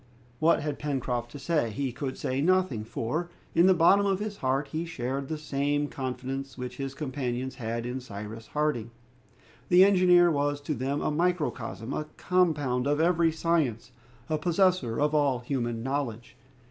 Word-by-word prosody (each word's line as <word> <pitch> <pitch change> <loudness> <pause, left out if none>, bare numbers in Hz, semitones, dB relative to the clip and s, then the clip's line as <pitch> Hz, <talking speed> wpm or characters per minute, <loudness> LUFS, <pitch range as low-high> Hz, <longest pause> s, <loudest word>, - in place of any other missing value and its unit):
What 160 0 +4
had 150 -2 -3
Pencroft 125 -5 -2
to 145 - -9
say? 145 -3 0
He 130 +5 -2
could 130 +2 -5
say 130 +2 -1
nothing, 180 -9 +2
for, 150 +10 -3 0.2
in 170 +2 +5
the 190 - +6
bottom 185 +4 +5
of 195 -1 +2
his 205 0 -5
heart 135 +2 0
he 160 +1 -2
shared 135 -4 -3
the 155 - -3 0.5
confidence 135 +1 -4
which 125 -1 -6
his 135 0 -4
companions 130 -3 -3
had 115 -1 -4
in 125 +2 -3
Cyrus 110 -1 -8
Harding. 150 -7 -1 0.8
The 180 +2 +8
engineer 180 -3 +5
was 145 -1 0
to 150 +2 -2
them 140 +1 -2
a - - 0
microcosm, 150 -7 -1
a 155 - -2
compound 145 -8 +1
of 145 +1 +1
every 170 0 +3
science, 155 -9 0 0.4
a 155 -1 -1
possessor 175 - +2
of 150 +1 +2
all 145 -4 +3
human 120 -2 -3
knowledge. 125 -4 -3
140 Hz, 160 wpm, -28 LUFS, 125-165 Hz, 0.8 s, The